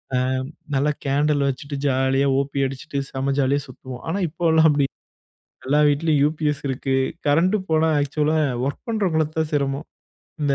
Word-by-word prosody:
அ - - +3 0.6
நல்லா 150 +2 +2
கேண்டில் 145 0 +2
வச்சுட்டு 140 +2 -5
ஜாலியா 135 +1 +2
ஓப்பி 140 0 -1
அடிச்சுட்டு 140 +2 -5
செம 135 +1 -1
ஜாலியா 140 +1 +1
சுத்துவோம். 130 -1 -9
ஆனா, 185 +5 -1
இப்போலா 160 0 +2
அப்படி 145 -2 +2 0.8
எல்லா 145 +2 +3
வீட்டிலும் 150 0 +2
UPS 150 -2 -1
இருக்கு. 135 0 -1 0.3
கரண்ட் 175 +8 +3
போனா 160 0 +3
ஆக்சுவல்‌லா 150 +2 +1 0.3
வொர்க் 140 - -5
பண்ணுறவங்களுக்கு 160 -8 0
தான் 155 -1 -1
சிரமம். 140 +1 -1 0.6
இந்த 140 -1 +2
145 Hz, 140 wpm, -22 LUFS, 135-155 Hz, 0.8 s, அ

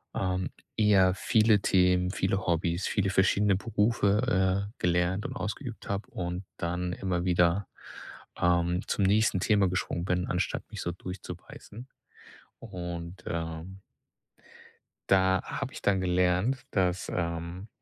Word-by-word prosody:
ähm, 95 -1 -1 0.3
eher 100 -4 +5
viele 110 0 +3
Themen, 90 -1 +3
viele 95 0 -1
Hobbys, 85 +1 0
viele 95 -1 0
verschiedene 95 +1 +3
Berufe, 100 -2 +1
äh, - - -28
gelernt 90 +3 +1
und - - -4
ausgeübt 115 +2 -5
habe 100 +1 -3
und 90 +1 -4
dann 90 +1 -2
immer 90 -2 -2
wieder, 90 +2 +2 0.7
ähm, 85 0 +2
zum 100 - 0
nächsten 105 -1 +3
Thema 100 -4 +3
geschwungen 90 -1 -2
bin, 90 -1 0
anstatt 90 - -1
mich - - -6
so 85 - -2
durchzubeißen. 90 +6 -9 0.7
Und, 90 -4 -7
ähm 85 +3 -5 1.3
da 95 -1 +4
habe 135 +2 -5
ich - - -8
dann 100 -2 +2
gelernt, 90 +7 +1
dass, 90 -2 0
ähm, 85 +3 -3
95 Hz, 125 wpm, -29 LUFS, 90-100 Hz, 1.3 s, eher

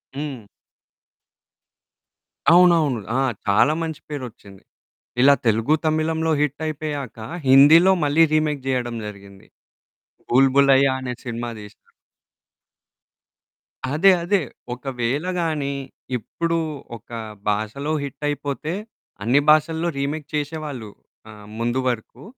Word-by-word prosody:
హ్మ్. 135 -7 -6 2.1
అవునవును. 170 -8 +5 0.2
ఆ! - - +2 0.3
చాలా 105 +9 +4
మంచి 160 -2 -5
పేరొచ్చింది. 120 -8 -8 0.6
ఇలా 140 +2 +7
తెలుగు, 115 +6 +2
తమిళంలో 160 +1 0
హిట్టయిపోయాక 150 -2 -3 0.3
హిందీలో 150 +8 +7
మళ్ళీ 150 +3 +4
రీమేక్ 150 -3 +1
జెయడం 125 -2 -1
జరిగింది. 100 -1 -11 0.8
'బుల్‌బులయా' 135 +1 +4
అనే 125 -1 -4
సినిమా 120 -1 -4
దీశారు. 105 0 -15 2.0
అదే. 190 +6 +6
అదే. 200 +3 +2 0.3
ఒకవేళ 125 +3 -3 0.2
గానీ 150 -4 -1 0.4
ఇప్పుడు 165 +8 -2 0.4
ఒక 115 - -27 0.4
భాషలో 110 +8 -2
హిట్టయిపోతే, 145 +2 -4 0.5
అన్ని 125 +6 +4
భాషల్లో 160 +2 +3
రీమేక్ 145 +1 -3
చేషేవాళ్ళు 145 -6 -4 0.4
ఆహ్, 105 -1 -13
ముందు 120 +2 0
వరుకు, 120 +1 -4
140 Hz, 90 wpm, -22 LUFS, 120-155 Hz, 2.1 s, ఇలా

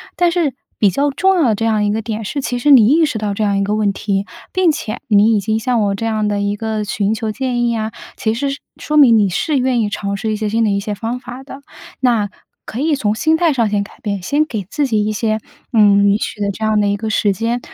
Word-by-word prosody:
但 350 -1 +2
是， 335 -6 0 0.2
比 205 - +4
较 280 +9 0
重 380 +6 +2
要 345 - +2
的 230 -5 +2
这 225 - -2
样 215 -2 +1
一 205 - +1
个 220 +2 -1
点 220 0 -4
是， 280 +8 -3
其 245 -2 -2
实 290 +5 +2
你 235 -6 +7
意 315 +5 +4
识 295 -7 -3
到 210 -2 -2
这 215 - -2
样 200 -1 +1
一 200 - +1
个 210 +1 0
问 210 -2 +1
题， 195 0 -2 0.3
并 370 -3 +3
且 215 -7 -5
你 215 +1 +4
已 - - +2
经 220 +2 -1
向 240 0 0
我 200 -1 +1
这 225 - -4
样 215 -1 0
的 205 -1 -1
一 205 0 -1
个 215 0 -3
寻 205 +1 -1
求 220 -1 -3
建 250 -1 -1
议 235 - 0
啊， 220 0 -3 0.2
其 220 - -1
实 275 +5 -2
是 275 - -5 0.2
说 300 - -3
明 260 -7 +7
你 205 -2 +3
是 280 - -1
愿 250 -2 +1
意 210 - 0
尝 200 -1 -3
试 220 +2 -2
一 215 - -1
些 215 -1 -2
新 225 +2 +1
的 215 - +2
一 200 0 +1
些 205 +1 -4
方 225 +4 -4
法 250 +1 -9
的。 275 0 -11 0.4
那 230 -5 +1 0.4
可 225 - -6
以 305 +2 +1
从 210 -6 0
心 315 +8 +2
态 335 -1 +2
上 235 -6 +1
先 205 -1 0
改 200 - -14
变， 200 -3 -3
先 290 +11 +1
给 220 -9 -4
自 290 -2 0
己 215 -3 +1
一 215 - -1
些， 215 0 -1 0.3
嗯， 205 -2 +5
允 200 +1 +3
许 215 - -5
的 200 -1 0
这 220 - -7
样 215 -1 +2
的 205 - +2
一 200 - +1
个 220 +2 -4
时 210 -2 +1
间， 230 +5 -1
220 Hz, 300 characters per minute, -17 LUFS, 205-255 Hz, 0.4 s, 你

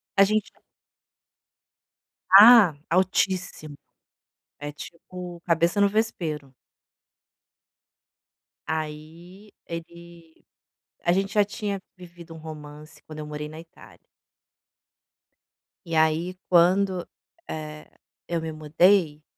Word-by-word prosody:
A 195 - +6
gente 215 +1 0 1.8
ah, 205 -4 +9
altíssimo, 180 -3 -1 0.8
é 145 0 -6
tipo 175 +3 -10
cabeça 170 +3 +1
no 200 - +4
vespeiro. 160 -10 -3 2.1
Aí 160 +6 -7
ele 170 0 -11 0.6
a 175 - +2
gente 195 +1 -1
já 210 - +4
tinha 205 -1 -4
vivido 175 -2 -13
um - - -11
romance 150 -1 -11
quando 155 -1 -10
eu 150 - -7
morei 150 0 -6
na 155 +1 -10
Itália. 165 +2 -17 1.8
E 165 - -4
aí 160 +3 +1
quando, 185 +1 +3 0.4
eh, 155 -1 -7 0.4
eu 170 -1 -2
me 160 0 -5
mudei 155 +1 +2
170 Hz, 95 wpm, -25 LUFS, 155-185 Hz, 2.1 s, ah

